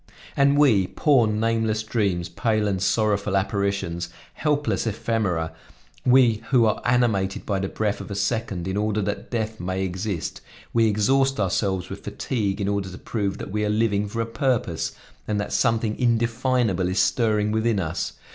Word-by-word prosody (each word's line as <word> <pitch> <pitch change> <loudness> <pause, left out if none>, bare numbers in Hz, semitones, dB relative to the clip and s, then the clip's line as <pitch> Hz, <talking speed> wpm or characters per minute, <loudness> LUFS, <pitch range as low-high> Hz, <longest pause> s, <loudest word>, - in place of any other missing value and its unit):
And 140 +1 +4
we, 115 -11 +4
poor 135 - +3
nameless 110 0 0
dreams, 100 -6 0
pale 110 -2 0
and 95 -2 -1
sorrowful 100 0 +1
apparitions, 95 -3 -1 0.2
helpless 145 -5 0
ephemera, 100 -7 -1 0.5
we 125 -4 +5
who 125 -4 +5
are 110 - +1
animated 115 -6 +1
by 100 -2 0
the 95 - -1
breath 105 -1 -1
of - - -9
a 100 - -4
second, 100 -3 -1
in 95 +1 -2
order 105 0 0
that 105 +1 -4
death 110 -2 -3
may 95 +1 -2
exist, 95 -1 -3 0.3
we 115 -1 +4
exhaust 135 +6 +2
ourselves 95 -1 0
with - - -7
fatigue 105 -6 -2
in 100 - -1
order 100 -2 -1
to 90 - -9
prove 100 -4 -2
that - - -7
we 105 +1 -1
are 105 - 0
living 105 -1 +1
for 115 +3 -3
a - - -1
purpose, 115 - -1 0.3
and 105 -1 0
that 105 - -3
something 115 -1 +1
indefinable 115 -5 +1
is 90 - -2
stirring 105 -3 +2
within 110 -1 +1
us. 80 -4 -3
105 Hz, 165 wpm, -24 LUFS, 100-115 Hz, 0.5 s, we